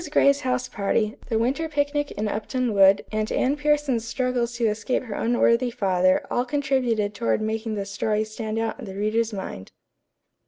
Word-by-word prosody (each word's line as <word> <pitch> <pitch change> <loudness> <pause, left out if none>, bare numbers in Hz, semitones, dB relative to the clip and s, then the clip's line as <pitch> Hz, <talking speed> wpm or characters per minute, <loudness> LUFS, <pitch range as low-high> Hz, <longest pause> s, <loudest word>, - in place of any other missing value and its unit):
Gray's 280 -1 +4
house 255 -2 -1
party, 210 +2 -1
the 225 - +1
winter 270 +8 0
picnic 290 -1 0
in 215 - -2
Upton 230 +3 -2
Wood, 195 0 +5
and 215 0 -1
Anne 270 +3 +1
Pierson's 295 -5 +1
struggles 245 0 -1
to 235 -1 0
escape 220 +4 0
her 225 -5 -6
unworthy 240 +2 +2
father 185 -4 +2
all 245 - +1
contributed 250 -6 0
toward 230 +2 0
making 220 0 -2
the 200 -1 -3
story 210 +2 -1
stand 215 0 -5
out 225 +3 -2
in 250 - -7
the 190 -2 -8
reader's 215 +3 0
mind. 190 - -7
230 Hz, 170 wpm, -24 LUFS, 210-255 Hz, -, Wood